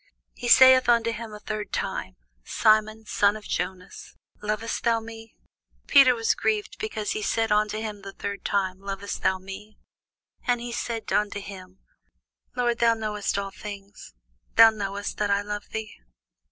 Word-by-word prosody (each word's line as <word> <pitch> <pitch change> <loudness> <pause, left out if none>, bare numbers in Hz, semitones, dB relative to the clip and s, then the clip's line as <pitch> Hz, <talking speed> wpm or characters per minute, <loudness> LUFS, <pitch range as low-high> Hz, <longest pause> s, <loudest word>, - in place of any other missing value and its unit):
He 245 - -6
saith 260 0 +7
unto 230 -1 +3
him 230 0 -6
the 210 0 -10
third 215 -1 -5
time, - - -3 0.3
Simon, 215 - +2
son 205 0 +2
of 215 - -12
Jonas, 180 +1 -5 0.3
lovest 215 +2 -3
thou 230 -1 +2
me? 225 0 -11 0.5
Peter 270 -3 +6
was 225 -1 +1
grieved 430 0 -1
because 320 - -3
he 215 - -2
said 225 +1 0
unto 210 0 +2
him 215 -2 -5
the 195 0 -8
third 200 +1 -6
time, 190 -2 -1
Lovest 195 0 -5
thou 190 - +2
me? 195 +3 -10 0.7
And 245 -1 +2
he 240 0 -6
said 235 -1 -4
unto 205 -1 0
him, 190 -2 -11 0.7
Lord, 240 -2 0
thou 230 -1 +4
knowest 210 -3 -2
all 200 0 -3
things; 200 - -10 0.4
thou 225 0 +9
knowest 200 -1 -5
that 210 -1 0
I 200 0 +2
love 210 0 -6
thee. 220 0 -5
215 Hz, 160 wpm, -25 LUFS, 200-230 Hz, 0.7 s, thou